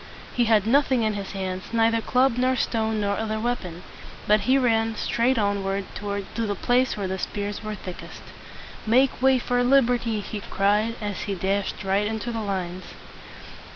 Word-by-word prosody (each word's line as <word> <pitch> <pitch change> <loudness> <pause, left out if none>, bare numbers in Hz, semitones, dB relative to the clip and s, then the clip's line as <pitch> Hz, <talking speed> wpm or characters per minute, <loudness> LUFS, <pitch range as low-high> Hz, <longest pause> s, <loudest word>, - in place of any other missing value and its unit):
He 245 - +2
had 220 -3 +3
nothing 260 0 +3
in 215 -1 +1
his 200 -2 -5
hands, 190 -1 -4
neither 230 0 +2
club 255 +1 +2
nor 255 +1 +2
stone 220 -3 0
nor 200 0 0
other 220 0 -2
weapon. 195 -7 -3 0.4
But 210 +1 +4
he 265 - +6
ran 225 -3 +2
straight 240 +4 +1
on 200 -2 0
ward 195 0 -2
to 200 0 -4 0.2
the 205 - -1
place 250 +3 +1
where 200 -2 -2
the 190 0 -3
spears 205 +2 -4
were 215 0 -4
thickest. 185 -2 -9 0.6
"Make 255 +3 +3
way 265 0 +5
for 245 0 0
lib 265 0 +5
er 245 - +2
ty!" 230 -2 -2
he 205 +1 -6
cried, 210 +3 +1
as 205 -2 -3
he 200 - -1
dashed 195 +3 -2
right 195 +2 +1
into 220 +2 -3
the 225 -1 -3
lines. 185 -3 -4
215 Hz, 185 wpm, -25 LUFS, 200-240 Hz, 0.6 s, he